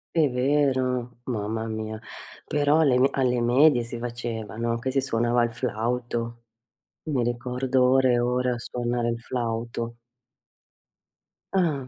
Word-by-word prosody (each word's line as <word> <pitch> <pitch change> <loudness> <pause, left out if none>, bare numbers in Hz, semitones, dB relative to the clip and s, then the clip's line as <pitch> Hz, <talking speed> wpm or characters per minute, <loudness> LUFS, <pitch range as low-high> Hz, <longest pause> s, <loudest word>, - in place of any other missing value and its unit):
È 155 -4 +4
vero, 130 -2 0
mamma 110 -2 -3
mia. 110 -1 -4 0.5
Però 145 +1 +2
alle 130 -5 +4
me 135 - +5
alle 125 -2 +1
medie 125 +3 +5
si 120 0 -6
faceva, 115 -2 -5
no, 115 0 0
che 130 +3 -3
si 135 0 +1
suonava 120 -1 +1
il 120 - 0
flauto. 120 0 -3 0.6
Mi 135 -6 +1
ricordo 125 +2 0
ore 130 0 +4
e 120 - +3
ore 125 +1 +1
a 120 - -3
suonare 120 0 -2
il 115 0 -2
flauto. 115 -1 -3 1.5
Ah. 155 -9 +1
120 Hz, 135 wpm, -25 LUFS, 115-130 Hz, 1.5 s, me